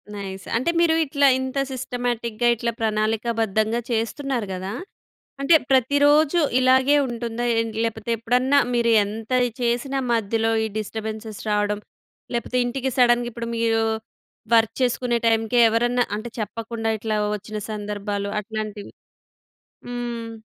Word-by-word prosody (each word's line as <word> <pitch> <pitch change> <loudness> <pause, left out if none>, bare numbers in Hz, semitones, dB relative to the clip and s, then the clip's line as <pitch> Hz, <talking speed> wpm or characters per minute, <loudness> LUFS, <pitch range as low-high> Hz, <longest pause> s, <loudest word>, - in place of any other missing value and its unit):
Nice. 195 -1 -7
అంటే 260 +8 0
మీరు 330 -1 +4
ఇట్లా 280 0 +3
ఇంత 260 +1 -4
సిస్టమాటిక్‌గా 240 -2 -2
ఇట్లా 235 +1 -2
ప్రణాళికాబద్ధంగా 220 0 0
చేస్తున్నారు 235 0 -1
గదా! 185 +2 -5 0.7
అంటే 300 +4 +5 0.2
ప్రతిరోజూ 285 +5 +4 0.2
ఇలాగే 260 +2 +4
ఉంటుందా? 235 0 -3
ఏంటి 225 -1 -3
లేపోతే 225 0 -3
ఎప్పుడన్నా 250 +5 +2
మీరు 235 -1 +2
ఎంతది 225 +4 -1
చేసినా 245 +3 0
మధ్యలో 225 0 +1
ఈ - - -1
డిస్టర్బె‌న్సెస్ 220 0 -6
రావడం, 210 0 +1 0.6
లేపోతే 245 +1 -2
ఇంటికి 260 +2 -2
సడెన్‌గా 240 -1 +4
ఇప్పుడు 235 0 -5
మీరు 225 -1 +2 0.7
వర్క్ 225 -1 +3
చేసుకునే 245 -1 +1
టైంకే 225 +1 +2
ఎవరన్నా 240 +2 +2
అంటే 225 +3 -6
చెప్పకుండా 225 +1 -3
ఇట్లా 215 -1 -1 0.2
వచ్చిన 210 +1 -7
సందర్భాలు 205 -1 -3
అట్లాంటివి. 215 -1 -6 1.0
హ్మ్. 240 -2 -4
230 Hz, 115 wpm, -23 LUFS, 220-245 Hz, 1.0 s, అంటే